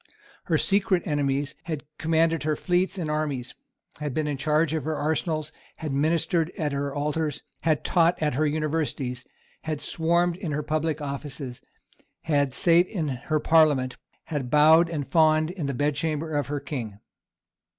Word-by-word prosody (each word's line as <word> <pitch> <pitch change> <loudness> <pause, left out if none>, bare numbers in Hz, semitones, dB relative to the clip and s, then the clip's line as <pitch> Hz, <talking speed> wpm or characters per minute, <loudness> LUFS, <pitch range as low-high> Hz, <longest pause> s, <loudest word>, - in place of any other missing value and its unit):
Her - - +2
secret 195 -2 +2
enemies 145 -2 0
had 160 -4 -4 0.2
commanded 165 0 +2
her 155 0 0
fleets 180 +4 0
and 170 -4 -2
armies, 150 -5 -2 0.5
had 150 -3 -3
been 155 - 0
in 145 -1 -1
charge 150 +3 +1
of 160 - -1
her 155 0 -2
arsenals, 155 +1 -1 0.2
had 155 -3 -5
ministered 165 +3 +1
at 150 -3 -1
her 140 0 -2
altars, 150 0 -2 0.2
had 155 -2 +1
taught 170 0 +3
at 150 -3 0
her 150 +4 +1
Universities, 145 -5 -2 0.4
had 155 -2 -2
swarmed 170 +2 +1
in 175 -6 -4
her 150 +1 -1
public 155 0 -1
offices, 140 -2 -6 0.6
had 140 -4 +1
sate 175 +3 +4
in 170 -8 -2
her 140 +4 -1
Parliament, 150 -5 +3 0.3
had 140 -5 -4
bowed 160 +4 +6
and 150 -5 -3
fawned 155 0 +3
in 175 -6 -4
the 140 - -2
bedchamber 150 +3 -1
of 145 - 0
her 145 0 -2
King. 125 -8 -6
155 Hz, 160 wpm, -26 LUFS, 145-160 Hz, 0.6 s, bowed